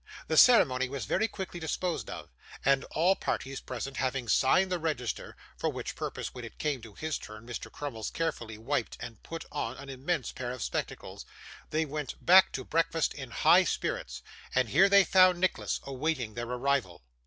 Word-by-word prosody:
The - - 0
ceremony 130 - +6
was 135 -5 -4
very 220 - +1
quickly 190 -4 -6
disposed 170 +2 -2
of, - - -7 0.4
and 135 0 +3
all 180 +5 +2
parties 135 -6 -3
present 130 +2 -5
having 130 -2 -1
signed 180 - +3
the 180 - 0
register 145 -8 -3 0.2
(for - - -1
which - - -5
purpose, - - -5
when 125 - -8
it 115 - -10
came 145 -5 -1
to 110 -3 -12
his 155 -1 -3
turn, 110 +1 -10
Mr. 120 -1 -6
Crummles 120 -7 -5
carefully 120 -10 -3
wiped 120 +2 -2
and 115 -3 -8
put 165 0 -7
on 130 -4 -3
an 140 - -10
immense 135 +2 -2
pair 125 -1 -5
of 125 -1 -4
spectacles), - - -4 0.5
they 160 +1 0
went 150 -2 -4
back 185 +2 +7
to 130 - -4
breakfast 165 0 +1
in 130 -4 -8
high 115 - +5
spirits. 60 0 -3 0.3
And 130 -3 +2
here 195 - +5
they 200 0 +7
found 185 -1 +5
Nicholas 185 0 0
awaiting 135 -4 -2
their 120 +1 -4
arrival. 125 - -1
135 Hz, 180 wpm, -30 LUFS, 120-165 Hz, 0.5 s, back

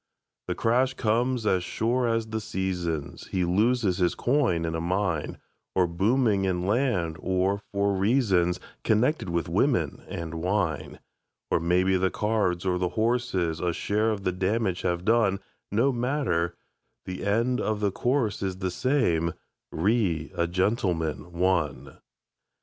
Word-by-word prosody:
The - - -1
crash 130 +3 +2
comes 120 +1 0
as 95 -4 +2
sure 120 +6 0
as 115 -1 0
the 110 0 -4
seasons; 90 -7 -3
He 95 -2 0
loses 105 +1 +2
his 90 -1 +2
coin 120 - +1
in 80 - -2
a 80 - -2
mine, 90 -2 -1 0.4
Or 95 - +4
booming 100 +4 +2
in 90 -1 -1
land, 100 -8 0
or 95 +2 0
for 100 0 +1
reasons 95 -4 +2 0.2
Connected 115 - +1
with 85 -2 -1
women - - +1
and 85 -1 -5
wine. 80 -6 -1 0.5
Or - - +3
maybe 90 +3 +2
the 95 +1 +2
cards 105 -5 0
or 90 -1 +1
the 90 -1 0
horses 110 -8 0
A 90 0 0
share 105 +5 0
of 105 -3 -2
the 90 - +1
damage 95 +1 0
have 90 0 -1
done 110 -4 +3 0.3
No 115 +7 +3
matter; 120 - 0 0.5
the 95 0 -5
end 115 +5 +1
of 110 -1 -1
the 100 -1 +1
course 120 0 0
is 95 -2 -2
The 95 -1 -2
same: 90 - +1 0.4
"Re 90 -4 0
a 85 - 0
Gentleman, 90 -3 -1
One". 75 -7 -1
95 Hz, 145 wpm, -26 LUFS, 85-115 Hz, 0.5 s, Or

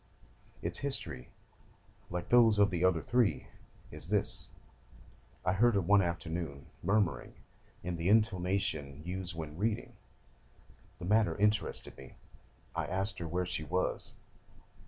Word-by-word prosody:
Its - - -1
history, 80 - -2 0.8
like 90 0 -4
those 115 -3 +6
of 100 -1 +4
the 90 -1 -1
other 90 -4 +3
three, 120 - +2 0.5
is - - -9
this: - - +2 1.0
I 90 - +3
heard 115 +3 +4
her 100 - +3
one 100 +3 +5
afternoon 85 -5 -3 0.2
murmuring 100 0 0 0.5
in 90 0 -3
the 85 +2 0
intonation 90 -9 +1
used 90 -1 -4
when 80 0 -6
reading; 110 +1 -1 1.0
the 90 - -7
matter 105 +3 +3
interested 105 0 +1
me; 65 - -12 0.6
I - - -1
asked 95 +3 -2
her 85 - -4
where 90 +3 -1
she 85 -2 -3
was. 90 +5 -2
90 Hz, 130 wpm, -32 LUFS, 85-105 Hz, 1.0 s, those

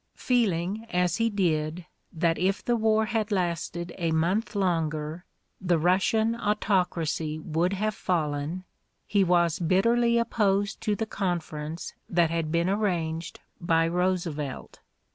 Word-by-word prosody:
Feeling, 215 -3 0
as 180 -2 +1
he 230 0 +2
did, 165 -4 -1 0.3
that 165 -1 0
if 190 +3 0
the 240 - +2
war 220 -1 +2
had 220 -1 -1
lasted 170 -2 -2
a 170 -1 0
month 175 +8 0
longer 165 -3 -1 0.4
the 175 -2 +3
Russian 195 +7 +2
autocracy 180 -8 0
would 165 +4 -1
have 215 +2 -1
fallen, 160 -1 -2 0.4
he 200 -1 +2
was 175 -2 +2
bitterly 230 +7 +3
opposed 205 -4 +1
to 210 -2 0
the 220 - -2
conference 170 -5 -4 0.2
that 170 -2 +2
had 165 -2 -1
been 170 +1 +1
arranged 175 -5 -1 0.2
by 165 -1 +2
Roosevelt. 170 -6 -2
180 Hz, 125 wpm, -27 LUFS, 165-205 Hz, 0.4 s, the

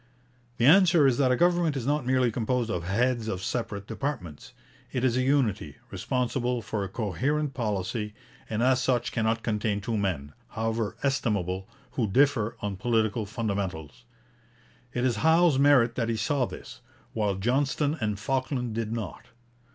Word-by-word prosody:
The 120 - +2
answer 175 0 +6
is 135 -1 +3
that 130 -2 +4
a - - +4
government 175 -1 +2
is 125 - -4
not 145 -2 0
merely 130 -2 +3
composed 120 0 -1
of 85 -6 -3
heads 115 +4 0
of 95 -4 -3
separate 105 -4 -3
departments. 110 - -5 0.4
It 125 - -2
is 125 -2 +2
a 130 - +2
unity, 125 -7 +1 0.2
responsible 125 +4 -1
for 105 0 -3
a 95 - -5
coherent 130 - -1
policy, 105 -2 -3 0.3
and 110 +1 -1
as 130 0 +3
such 125 -1 0
cannot 115 -1 0
contain 105 -2 0
two 110 +3 -3
men, 80 -8 -2
however 110 -2 -2
estimable, 100 -8 -1 0.2
who 115 -4 -1
differ 120 -2 +2
on 100 -2 -3
political 110 0 0
fundamentals. 95 - -4 0.9
It 125 +2 -1
is 120 -4 +1
Howe's 160 +3 +4
merit 135 -5 +5
that 115 -1 -1
he 115 - 0
saw 125 +5 +1
this, - - -10 0.3
while 105 -3 0
Johnston 135 +8 0
and 105 -2 -1
Falkland 130 +1 -2
did 110 -1 -3
not. 110 -9 -5
115 Hz, 160 wpm, -27 LUFS, 105-130 Hz, 0.9 s, answer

